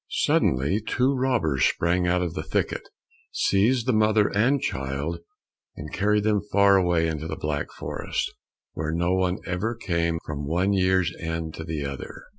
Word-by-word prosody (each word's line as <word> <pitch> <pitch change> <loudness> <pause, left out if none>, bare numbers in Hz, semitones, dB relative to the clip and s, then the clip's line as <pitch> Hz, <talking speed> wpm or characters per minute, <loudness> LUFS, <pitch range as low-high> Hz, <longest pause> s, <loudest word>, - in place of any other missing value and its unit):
Suddenly 70 +12 +1
two 130 +4 +1
robbers 120 - +1
sprang 90 +1 +2
out 90 +1 +2
of 85 - -3
the - - -3
thicket, - - -2 0.4
seized 115 +5 +2
the 130 - +2
mother 110 -1 +3
and 125 +7 +3
child, 70 - -3 0.6
and 75 +1 -8
carried 105 +1 +2
them 105 -1 +2
far 100 -1 +5
away 90 -3 +3
into 80 -1 -3
the - - -4
black 75 -1 -3
forest, - - -3 0.4
where 80 0 -3
no 85 +2 +1
one 95 0 +1
ever 95 +6 -2
came 85 -6 -1
from 75 -2 -4
one 90 +6 +1
year's 95 -2 +2
end 80 -1 -4
to 80 - -7
another. 70 -4 -5
90 Hz, 160 wpm, -25 LUFS, 80-105 Hz, 0.6 s, far